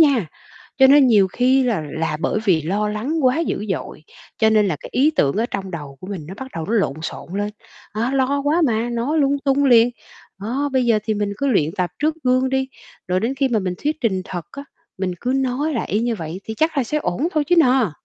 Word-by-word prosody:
nha. 275 - +4 0.5
Cho 265 - +8
nên 275 0 +6
nhiều 205 -5 +4
khi 260 +5 +2
là 225 -9 0
là 160 -1 -2
bởi 215 - 0
vì 175 -7 +3
lo 205 +6 -1
lắng 235 +10 -2
quá 255 +4 +3
dữ 215 -10 -2
dội, 165 -3 -5 0.3
cho 220 -1 +4
nên 210 -2 +3
là 155 - -1
cái - - -9
ý 285 +4 +3
tưởng 140 -1 +2
ở 225 +3 +1
trong 195 -1 -4
đầu 145 -5 -7
của 185 - -9
mình 185 -7 -6
nó 190 - -8
bắt 265 +4 -8
đầu 160 -1 -4
nó 215 - -3
lộn 200 -11 +1
xộn 160 - -6
lên, 205 0 -1 0.4
đó, 230 +4 0
lo 275 +1 +1
quá 315 +4 +2
mà, 235 0 0
nói 245 +7 -1
lung 280 0 +2
tung 280 0 +2
liền. 240 -2 +6 0.5
Đó, 265 +7 -2
bây 260 -2 +2
giờ 230 -2 +4
thì 220 - 0
mình 205 -1 -2
cứ 280 - 0
luyện 165 - +2
tập 180 -2 -1
trước 305 +2 +1
gương 255 +1 +2
đi, 265 0 0 0.4
rồi 180 +1 +1
đến 235 +6 -1
khi 270 0 +1
mà 235 -3 +1
mình 185 -3 -2
thuyết 300 +1 0
trình 190 -6 0
thật 175 -3 -6
á, 280 0 -8 0.3
mình 185 -1 -2
cứ 250 - -1
nói 270 +4 -1
lại 230 - -2
y 210 - +1
như 235 0 0
vậy 170 -1 -6
thì 220 - -5
chắc 315 +6 0
là 260 - +2
sẽ 300 +6 -1
ổn 275 - -1
thôi 305 -2 +1
chứ 355 - +4
nà. 255 - +4
235 Hz, 250 wpm, -20 LUFS, 195-270 Hz, 0.5 s, Cho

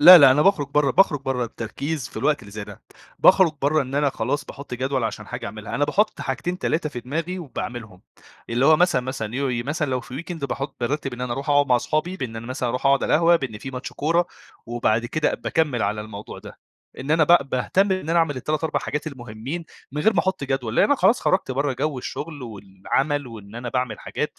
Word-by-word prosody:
لأ، 175 +4 +12
لأ، 140 -3 +8
أنا 145 +3 +4
باخرج 190 -7 +3
برّه 145 -1 +3
باخرج 150 -3 +4
برّه 130 -2 -1
التركيز 130 +5 -4
في - - -15
الوقت 150 -3 +1
اللي 100 - -13
زي 105 0 -6
ده. - - -12 0.4
باخرج 185 -4 +6
بره 150 +2 +3
إن 130 0 -7
أنا 145 0 +2
خلاص 135 +4 -2
باحط 140 -3 -8
جدول 130 0 -1
عشان 110 -1 -4
حاجة 120 +1 -5
أعملها. 105 +1 -7
أنا 145 - +2
باحط 205 +9 +1
حاجتين، 150 +7 -3
3 160 -4 0
في 125 -5 -6
دماغي 165 +9 -3
وباعملهم. 120 - -6 0.5
اللي 120 +4 +2
هو 155 - +7
مثلًا، 175 -6 +3
مثلًا 130 -4 -3
اللي 120 +6 -4
هو 140 - 0
إيه، 120 -2 -1
مثلًا 145 +1 -2
لو 130 - 0
في 130 +5 -7
weekend 170 -5 -5
باحط 135 +1 -4
بارتب 135 +1 -2
إن 120 - -10
أنا 125 -1 -2
أروح 135 +4 -3
أقعد 145 0 +4
مع 125 -2 +4
أصحابي، 155 +9 -1
بإن 120 -8 -5
أنا 115 +1 -7
مثلًا 130 -1 -2
أروح 125 +3 -1
أقعد 135 0 +4
على - - +2
القهوة، 170 +2 +5
بإن 130 -9 -5
في 135 - -7
ماتش 125 0 -6
كورة، 170 +4 +1 0.4
وبعد 115 -1 0
كده 155 +5 0
باكمّل 150 -8 0
على 105 +1 -1
الموضوع 105 -1 -8
ده، - - -12 0.4
إن 135 +3 -5
أنا 155 0 +5
ب 160 -4 +5
باهتم 190 +10 +2
إن 185 -4 -3
أنا 170 - +3
أعمل 160 -4 +1
ال3، 155 +5 -2
4 160 - 0
حاجات 150 +2 -3
المُهمين 130 +4 -6 0.3
من 150 +1 -2
غير 220 - +5
ما 175 - +1
أحط 190 -5 -1
جدول، 130 -4 -2
لأن - - +6
أنا 290 - +4
خلاص 215 +4 +4
خرجت 185 -7 +1
برّه 140 +2 0
جو 140 +2 -2
الشغل 145 +3 -6
والعمل، 115 +7 -2
وإن 110 -3 -11
أنا 120 +1 -5
باعمل 125 -3 -2
حاجات. - - -4
135 Hz, 230 wpm, -23 LUFS, 120-155 Hz, 0.5 s, لأ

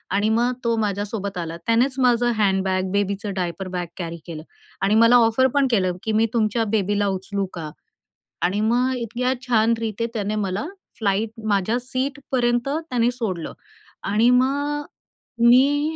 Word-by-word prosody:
.आणि 205 +2 +2
मग 240 +3 +2
तो 230 -1 +1
माझ्यासोबत 205 -1 -2
आला. 165 -1 -4
त्यानेच 240 +4 +2
माझं 240 -1 +3
हँडबॅग, 190 -2 +1
बेबीचं 200 0 -1
डायपर 185 0 -3
बॅग 175 -1 -2
कॅरी 170 -2 -5
केलं 160 -3 -7 0.4
आणि 200 +2 +3
मला 230 +2 +6
ऑफर 260 +4 +3
पण 280 -2 +3
केलं 185 -5 +2
की 220 - -1
मी 220 +1 +3
तुमच्या 225 0 +1
बेबीला 205 -1 +1
उचलू 195 +1 -2
का? 160 -3 -6 0.7
आणि 190 +4 +1
मग 250 +2 +2
इतक्या 245 +2 -1
छान 230 -1 +3
रीते 225 0 -2
त्याने 210 -1 -2
मला 200 0 -2 0.3
फ्लाइट 205 +1 0 0.2
माझ्या 205 +2 +1
सीटपर्यंत 255 -1 -1 0.2
त्याने 240 -2 +2
सोडलं. 210 -9 -4 0.5
आणि 215 +4 +3
मग 285 +3 +1
अ, - - -16 0.6
मी 285 +6 +4
220 Hz, 150 wpm, -22 LUFS, 195-245 Hz, 0.7 s, मला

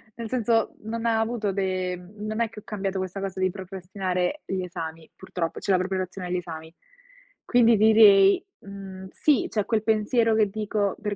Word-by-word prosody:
nel 230 -2 -6
senso, 230 -3 +1
non 230 +1 -4
ha 225 -1 +2
avuto 225 -3 -1
de 185 -2 -1 0.2
non 215 +2 -3
è 230 - +1
che 210 - -10
ho - - -17
cambiato 195 -2 -3
questa 185 +1 -4
cosa 190 -1 -4
di 185 0 +2
procrastinare 190 +4 -3
gli 190 -1 -2
esami, 165 -2 -7
purtroppo, 175 -3 -4
cioè 200 - -1
la 185 - +5
preparazione 185 0 -3
agli 180 - -2
esami. 160 -2 -7 0.7
Quindi 235 -3 +5
direi, 210 - +6 0.2
mhmm, 195 -1 -9
sì, 295 -4 +2
c'è 210 -2 -1
quel 225 -2 +1
pensiero 220 +1 +2
che 215 -2 +3
dico 205 -1 -1
per 210 -1 -2
200 Hz, 180 wpm, -25 LUFS, 185-220 Hz, 0.7 s, direi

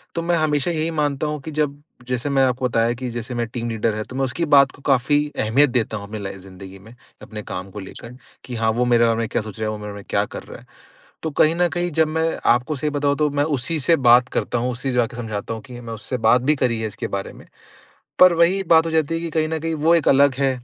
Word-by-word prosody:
तो 170 - -1
मैं 170 +1 +1
हमेशा 155 0 +1
यही 160 0 -1
मानता 145 0 -1
हूँ 150 0 -3
कि 155 - -7
जब 145 -1 -2 0.3
जैसे 125 +2 -2
मैं 135 -1 +3
आपको 130 0 +1
बताया 115 0 +1
कि 130 -1 -4
जैसे 120 +1 -6
मेरा 120 -1 -2
टीम 120 -1 -3
लीडर 110 -1 -1
है, 110 - -3
तो 125 - -11
मैं 135 0 0
उसकी 150 +7 -2
बात 140 -1 +6
को - - -18
काफ़ी 145 +2 +1
अहमियत 135 +7 +3
देता 120 -3 -1
हूँ 100 - -8
अपनी 110 +1 -6
लाइ 95 0 -5
ज़िंदगी 95 0 -12
में, 110 +5 -15 0.3
अपने 110 -1 -8
काम 90 +1 -6
को 105 - -8
लेकर, 115 +5 -9 0.3
कि, 125 - -6
"हाँ, 110 -1 +1
वो 120 +2 0
मेरे 120 -1 +4
बारे 115 -1 +2
में 115 -1 -1
क्या - - -1
सोच 110 -1 -10
रहे 110 - -1
हैं? - - -1
वो 110 - -5
मेरे 105 0 -7
बारे 100 0 -8
में - - -19
क्या - - +1
कर - - -6
रहा - - -11
है?" - - -20 0.6
तो 160 - -2
कहीं 155 +2 +3
न 175 0 +2
कहीं 175 0 -2
जब 160 +1 +2
मैं 160 +1 0 0.3
आपको 125 +5 -2
सही 150 +2 -2
बताऊँ, 145 -1 0
तो 150 0 +1
मैं 145 0 0
उसी 155 +7 -2
से 165 +5 +3
बात 125 +2 +6
करता 120 - -2
हूँ, 125 +2 -1
उसे 125 +3 -4
ही 130 - -1
जाके 120 -1 0
समझाता 115 -2 -4
हूँ 110 - -8
कि 120 0 -10
मैं 115 -1 -8
उससे 110 +4 -5
बात 125 +2 +5
भी 150 +4 +2
करी 120 -4 0
है 110 - -2
इसके 105 - -6
बारे 100 0 -4
में। - - -15 0.7
पर 185 -1 +8
वही 170 +4 +3
बात 160 0 +5
हो 165 - -2
जाती 160 -1 +1
है - - -2
कि 170 - -4
कहीं 155 0 0
न 160 - -1
कहीं 165 +1 -3
वो 160 +2 +3
एक 165 - 0
अलग 140 0 +5
है। 135 0 +2
130 Hz, 285 wpm, -21 LUFS, 115-150 Hz, 0.7 s, पर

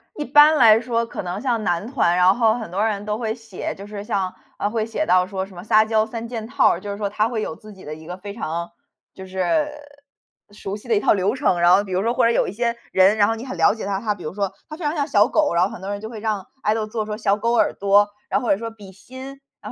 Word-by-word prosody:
一 300 - -3
般 295 +2 +6
来 225 -4 +7
说 235 -1 -1
可 230 - -6
能 180 +3 -4
像 240 -5 -1
男 175 +2 -1
团， 235 -9 +1
然 180 +2 +5
后 225 -2 +3
很 225 -5 -5
多 195 +5 0
人 205 -2 -1
都 210 0 -2
会 220 -1 -2
写， 225 -4 -6
就 200 +1 -10
是 205 -1 -7
像， 195 -4 -1 0.3
呃， 205 - -1
会 220 0 -1
写 230 +7 -2
到 180 0 +4
说 190 0 -4
什 195 -1 -16
么 175 - -9
撒 215 +1 +4
娇 220 0 +1
三 230 +1 -6
件 230 -2 -5
套 270 +4 +3
儿， 170 - 0
就 205 +2 -6
是 200 - -5
说 205 -1 -2
他 210 +2 +1
会 230 -2 -3
有 160 - -4
自 215 +4 -13
己 190 - -15
的 150 - -7
一 160 +1 -13
个 180 +2 -6
非 200 +2 -8
常， 170 -5 -4 0.5
就 190 - -9
是， 190 - 0 0.8
熟 200 -1 -6
悉 215 - -15
的 230 - +2
一 - - +3
套 - - +3
流 200 +1 0
程。 255 -9 +1
然 175 0 +5
后 200 - +2
比 195 - -10
如 185 +1 0
说， 230 +2 +1
或 - - +2
者 230 - +4
有 - - +1
一 - - -4
些 235 +3 -1 0.2
人， 190 +3 +4
然 205 -1 +4
后 225 - +1
你 225 - -8
很 255 -8 -6
了 165 - +4
解 225 - -6
他， 195 -1 -1
他 215 0 -1
比 205 - -12
如 155 - -5
说， 200 -2 -1 0.2
他 310 - -7
非 335 - -6
常 295 +2 0
像 285 -2 -1
小 210 -8 +4
狗， 310 -1 +1
然 170 - +4
后 190 - +1
很 - - -9
多 190 - -6
人 205 0 -3
就 220 - -7
会 220 - -7
让 210 -3 -2 0.2
Idol 215 +1 +1
做 215 0 -3
说 210 0 -4
小 205 -2 +2
狗 230 +3 -1
耳 235 - +3
朵， 200 +1 +3 0.2
那 - - +1
或 240 - -1
者 195 - +3
说 230 - -4
比 210 -4 -13
心， 260 +7 -11 0.4
然 - - -8
210 Hz, 330 characters per minute, -22 LUFS, 190-230 Hz, 0.8 s, 来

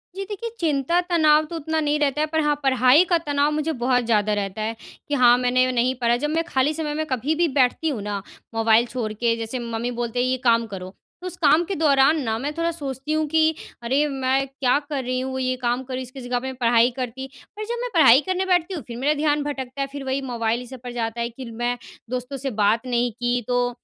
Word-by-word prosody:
जी, 390 - -4
देखिए, 445 +3 -4
चिंता 310 +1 +1
तनाव 310 -3 +4
तो 335 - -8
उतना 320 0 -2
नहीं 300 -1 0
रहता 290 0 +1
है, 310 - +1
पर 315 +1 -1
हाँ, 295 -1 +2
पढ़ाई 260 +3 +5
का 345 - +4
तनाव 290 0 +1
मुझे 305 +1 -1
बहुत 250 -1 +2
ज़्यादा 215 -2 +2
रहता 200 0 -3
है। 220 +1 -2 0.3
कि 290 - -3
हाँ, 245 -2 +6
मैंने 255 +1 +2
नहीं 250 +1 +1
पढ़ा 235 0 +3
जब 295 +4 -2
मैं 325 +2 0
खाली 275 -1 +1
समय 305 -1 -3
में 310 +1 -2
कभी 270 +2 -1
भी 340 +1 +2
बैठती 260 +5 +2
हूँ 250 -8 -3
ना, 205 -1 -3 0.3
मोबाइल 225 +1 +4
छोड़ 240 -3 -4
के 230 +2 +1
जैसे 230 +3 -4
मम्मी 235 0 -3
बोलते 240 0 -2
हैं 250 - +2
ये 255 0 0
काम 230 -1 +3
करो, 185 -3 -7 0.3
तो 365 - -5
उस 360 - -5
काम 315 0 +4
के 390 - -3
दौरान 290 0 +4
ना, 220 -2 -1
मैं 285 +4 -3
थोड़ा 335 0 0
सोचती 280 -3 -5
हूँ 310 0 +1
कि 320 +1 +2 0.3
अरे 270 +5 +2
मैं 270 -1 0
क्या 270 -1 +1
कर 280 -3 -2
रही 255 +1 -2
हूँ 260 0 -3
ये 255 0 0
काम 245 +1 0
कर 260 0 -8
रही 255 - -2
हूँ - - -4
इसकी 255 +2 -10
जगह 245 0 0
पे 265 +1 -5
पढ़ाई 235 +1 +4
करती 255 +1 -4 0.3
और 430 - -4
जब 470 +2 -3
मैं - - -3
पढ़ाई 275 -6 +7
करने 375 0 0
बैठती 365 0 +1
हूँ, 325 - -5
फ़िर 235 -1 -7
मेरा 280 +4 +2
ध्यान 295 0 +1
भटकता 275 -2 -5
है। 275 - -1
फ़िर 280 0 -8
वही 265 +1 -1
मोबाइल 235 -2 -1
इस 250 - -10
सब 260 -1 -9
पर 245 - -6
जाता 235 -1 -3
है 235 - -1
कि 255 +2 -9
मैं 240 +2 -2 0.3
दोस्तों 255 +2 -4
से 270 +1 -3
बात 225 +4 +2
नहीं 245 0 +1
की 245 +2 -1
तो 245 0 +1
260 Hz, 250 wpm, -23 LUFS, 240-300 Hz, 0.3 s, पढ़ाई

